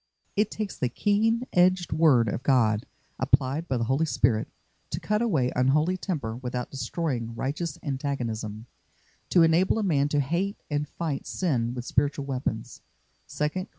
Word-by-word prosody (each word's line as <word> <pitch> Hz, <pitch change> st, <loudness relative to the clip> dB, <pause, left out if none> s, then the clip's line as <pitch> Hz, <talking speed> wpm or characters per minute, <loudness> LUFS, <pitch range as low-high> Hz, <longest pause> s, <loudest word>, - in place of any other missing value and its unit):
It 210 Hz, 0 st, +2 dB
takes 215 Hz, -3 st, -4 dB
the 125 Hz, -, -1 dB
keen 220 Hz, -, +1 dB
edged 180 Hz, -1 st, +3 dB
word 150 Hz, -7 st, +5 dB
of 105 Hz, -, -2 dB
God, 115 Hz, -6 st, +2 dB, 0.3 s
applied 140 Hz, +6 st, +1 dB
by 130 Hz, -, 0 dB
the 115 Hz, -, 0 dB
Holy 135 Hz, +7 st, +1 dB
Spirit, 110 Hz, -6 st, +2 dB, 0.4 s
to -, -, -3 dB
cut 210 Hz, +1 st, 0 dB
away 155 Hz, -, +1 dB
unholy 150 Hz, +8 st, +3 dB
temper 150 Hz, -, -3 dB
without 125 Hz, -1 st, -4 dB
destroying 125 Hz, -3 st, -3 dB
righteous 145 Hz, +5 st, -3 dB
antagonism; 120 Hz, -7 st, -3 dB, 0.6 s
to 175 Hz, -, +5 dB
enable 165 Hz, +6 st, +3 dB
a 220 Hz, -, 0 dB
man 145 Hz, -7 st, +2 dB
to 145 Hz, -, +1 dB
hate 170 Hz, +9 st, -1 dB
and 145 Hz, 0 st, 0 dB
fight 160 Hz, -5 st, -4 dB
sin 125 Hz, -9 st, -1 dB
with 125 Hz, -1 st, -5 dB
spiritual 140 Hz, +1 st, 0 dB
weapons 125 Hz, -3 st, -4 dB, 0.5 s
(2 150 Hz, 0 st, -1 dB
Cor. 185 Hz, +5 st, -5 dB
140 Hz, 155 wpm, -27 LUFS, 125-175 Hz, 0.6 s, word